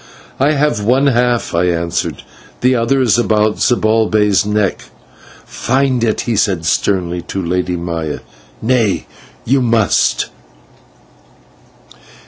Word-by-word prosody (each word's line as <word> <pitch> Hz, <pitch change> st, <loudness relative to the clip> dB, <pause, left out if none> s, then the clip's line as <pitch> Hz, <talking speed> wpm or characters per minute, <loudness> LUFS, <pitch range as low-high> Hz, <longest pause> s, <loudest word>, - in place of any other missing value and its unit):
"I 140 Hz, +3 st, +3 dB
have 145 Hz, -7 st, 0 dB
one 130 Hz, +6 st, +2 dB
half," 125 Hz, -2 st, +1 dB
I 85 Hz, +1 st, +1 dB
answered, 85 Hz, -1 st, -2 dB, 0.4 s
"the 125 Hz, +1 st, +3 dB
other 125 Hz, +3 st, +1 dB
is 120 Hz, -1 st, +3 dB
about 110 Hz, -2 st, +1 dB
Zibalbay's 110 Hz, -3 st, +2 dB
neck." 105 Hz, -2 st, -1 dB, 0.6 s
"Find 130 Hz, -1 st, 0 dB
it," 110 Hz, -2 st, 0 dB
he 120 Hz, -, -2 dB
said, 95 Hz, -5 st, 0 dB
sternly, 90 Hz, 0 st, 0 dB
to 95 Hz, -, -3 dB
the -, -, -4 dB
Lady 90 Hz, 0 st, -1 dB
Maya. 85 Hz, -3 st, -4 dB, 0.4 s
"Nay, 115 Hz, -4 st, +1 dB, 0.4 s
you 135 Hz, +3 st, +2 dB
must!" 115 Hz, -6 st, +1 dB
110 Hz, 115 wpm, -15 LUFS, 90-125 Hz, 0.6 s, I